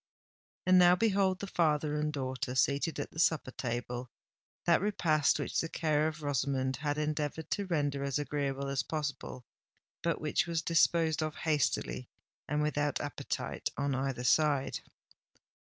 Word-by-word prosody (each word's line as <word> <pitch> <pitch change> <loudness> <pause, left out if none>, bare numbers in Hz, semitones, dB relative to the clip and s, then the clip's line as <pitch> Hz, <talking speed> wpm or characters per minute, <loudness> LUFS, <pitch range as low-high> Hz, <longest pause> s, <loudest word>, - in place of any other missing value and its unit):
And 185 0 +6
now 180 0 +7
behold 195 -2 +2
the - - -2
father 155 -5 +1
and 150 0 0
daughter 130 -3 -3
seated 140 +5 +1
at - - -4
the 160 - -8
supper 160 -5 +2
table—that 125 +7 -3
repast 160 -7 +2
which - - -1
the 165 - -4
care 155 -2 +1
of 155 -1 -5
Rosamond 135 -2 0
had 145 +1 -2
endeavoured 150 +1 -2
to 200 -2 -1
render 145 -5 0
as 140 0 0
agreeable 140 -2 -2
as 135 -1 0
possible, 145 -3 -4 0.6
but 170 -1 0
which 155 +2 0
was 165 -1 -1
disposed 165 -1 +3
of 155 -1 -2
hastily 135 - -1 0.4
and 150 +1 0
without 145 -1 0
appetite 145 - -3
on 140 -1 0
either 130 -2 -2
side. 140 +1 +2
150 Hz, 145 wpm, -32 LUFS, 140-160 Hz, 0.6 s, now